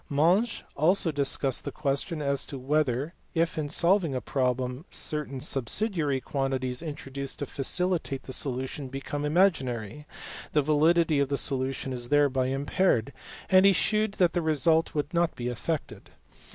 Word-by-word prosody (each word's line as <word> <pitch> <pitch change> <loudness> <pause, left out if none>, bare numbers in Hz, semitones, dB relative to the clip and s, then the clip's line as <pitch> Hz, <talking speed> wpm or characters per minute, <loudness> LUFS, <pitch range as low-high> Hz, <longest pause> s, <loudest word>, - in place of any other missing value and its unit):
Monge 175 +11 +2
also 165 +2 +3
discussed 140 -2 +2
the - - -4
question 150 +2 -2
as 140 -1 0
to 140 - -6
whether, 140 +2 0 0.2
if 165 0 +1
in 150 -2 -3
solving 170 -3 +2
a - - 0
problem 125 +1 -2
certain 150 -3 -3
subsidiary 145 - 0
quantities 130 -1 -2
introduced 140 -3 -6
to 145 - -3
facilitate 155 -1 -1
the 130 - -7
solution 130 +1 -1
become 135 +2 -5
imaginary, 150 - 0 0.5
the 150 - +3
validity 155 +1 +3
of 140 -1 +1
the 140 - 0
solution 135 -1 0
is 120 -1 -5
thereby 140 -3 +2
impaired, 140 - 0 0.3
and 185 0 +5
he 195 0 +6
shewed 215 +2 +1
that 180 -4 +2
the 175 - 0
result 160 +1 +1
would 150 +3 -2
not 170 -1 +1
be 120 0 -3
affected. 140 +6 -4
145 Hz, 150 wpm, -27 LUFS, 135-165 Hz, 0.5 s, he